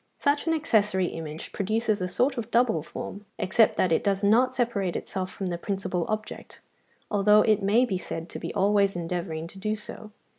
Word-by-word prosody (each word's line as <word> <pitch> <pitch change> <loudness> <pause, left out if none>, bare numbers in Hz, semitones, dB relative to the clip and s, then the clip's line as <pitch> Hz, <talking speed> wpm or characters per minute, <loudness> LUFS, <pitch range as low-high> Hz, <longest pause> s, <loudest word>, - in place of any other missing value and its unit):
Such 285 +2 +1
an 325 - +3
accessory 210 - +2
image 160 -1 -7
produces 215 +1 0
a 180 - 0
sort 255 +9 +1
of 235 -3 -5
double 235 -9 +2
form; 200 +6 -8
except 215 +4 +3
that 185 - +1
it 160 - +2
does 200 -1 0
not 245 +5 +4
separate 205 -7 0
itself 185 -1 -4
from 195 - -6
the 175 -2 -2
principal 185 -3 -2
object, 215 0 -5 0.5
although 210 +1 +5
it 215 -1 +3
may 215 +6 +3
be 190 -7 -2
said 165 -2 -6
to - - -7
be - - -5
always 200 0 +3
endeavouring 170 -2 -3
to 190 +3 -11
do 215 +2 -1
so. 215 0 -10
200 Hz, 190 wpm, -26 LUFS, 185-220 Hz, 0.5 s, although